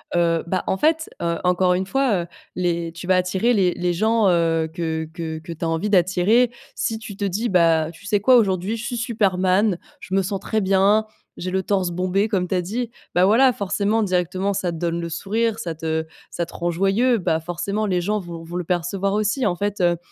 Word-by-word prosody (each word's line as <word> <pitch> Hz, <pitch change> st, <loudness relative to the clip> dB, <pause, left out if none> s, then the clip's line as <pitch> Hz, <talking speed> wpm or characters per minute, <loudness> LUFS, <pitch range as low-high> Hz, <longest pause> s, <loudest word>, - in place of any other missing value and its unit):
Heu, 170 Hz, -1 st, +2 dB
bah, 185 Hz, +1 st, -1 dB
en -, -, +1 dB
fait, 320 Hz, +5 st, +1 dB
heu, 170 Hz, 0 st, 0 dB
encore 180 Hz, 0 st, +3 dB
une 185 Hz, +1 st, -1 dB
fois, 225 Hz, -4 st, +1 dB
heu, -, -, -11 dB, 0.3 s
les, 170 Hz, -2 st, -1 dB
tu 170 Hz, +1 st, -9 dB
vas 185 Hz, -, +4 dB
attirer 185 Hz, +6 st, +1 dB
les 185 Hz, -5 st, +2 dB
les 175 Hz, 0 st, -1 dB
gens, 220 Hz, +3 st, +2 dB
heu, 165 Hz, -2 st, +2 dB
que 160 Hz, -1 st, -2 dB
que 160 Hz, -2 st, -5 dB
que 165 Hz, +2 st, -8 dB
tu 165 Hz, -, -9 dB
as 165 Hz, -, 0 dB
envie 165 Hz, +6 st, -1 dB
d'attirer, 195 Hz, +6 st, +3 dB, 0.2 s
si 225 Hz, -2 st, -2 dB
tu 215 Hz, -3 st, -8 dB
te 200 Hz, -, -5 dB
dis: 200 Hz, +5 st, -1 dB
«Bah, 165 Hz, -4 st, +3 dB
tu 170 Hz, -, -16 dB
sais 205 Hz, -1 st, +1 dB
quoi? 255 Hz, +6 st, +5 dB
Aujourd'hui, 195 Hz, -2 st, +2 dB
je 225 Hz, -, -6 dB
suis 240 Hz, 0 st, -3 dB
superman, 200 Hz, -4 st, +1 dB, 0.2 s
je 190 Hz, -, -8 dB
me 195 Hz, -, +3 dB
sens 195 Hz, +1 st, -3 dB
très 220 Hz, +3 st, -1 dB
bien, 195 Hz, +3 st, +3 dB, 0.3 s
j'ai 185 Hz, +1 st, -5 dB
le 190 Hz, +1 st, 0 dB
torse 190 Hz, -2 st, 0 dB
bombé», 185 Hz, +4 st, 0 dB
comme 185 Hz, -4 st, 0 dB
tu 185 Hz, -, -1 dB
as 180 Hz, -, +1 dB
dit. 225 Hz, +7 st, -3 dB, 0.3 s
Bah, 180 Hz, +1 st, +5 dB
voilà, 245 Hz, +6 st, +5 dB
forcément, 205 Hz, +2 st, 0 dB
directement, 185 Hz, +1 st, 0 dB
ça 185 Hz, -3 st, -1 dB
te 165 Hz, -, -6 dB
donne 170 Hz, 0 st, -1 dB
le 170 Hz, -, -4 dB
sourire, 215 Hz, +7 st, -1 dB
ça 165 Hz, -2 st, -4 dB
te 160 Hz, 0 st, -2 dB, 0.3 s
ça 170 Hz, -, -2 dB
te -, -, -15 dB
rend 175 Hz, 0 st, -2 dB
joyeux, 195 Hz, +8 st, +2 dB
bah 170 Hz, -5 st, 0 dB
forcément 175 Hz, +6 st, -3 dB
les 180 Hz, -3 st, 0 dB
gens 210 Hz, +4 st, 0 dB
vont 170 Hz, -3 st, -8 dB
vont 170 Hz, +1 st, -9 dB
le 180 Hz, -, -1 dB
percevoir 185 Hz, +3 st, -1 dB
aussi, 215 Hz, +5 st, 0 dB
en 185 Hz, -4 st, +1 dB
fait, 205 Hz, +2 st, -2 dB
heu. 175 Hz, -1 st, +3 dB
185 Hz, 225 wpm, -22 LUFS, 170-210 Hz, 0.3 s, quoi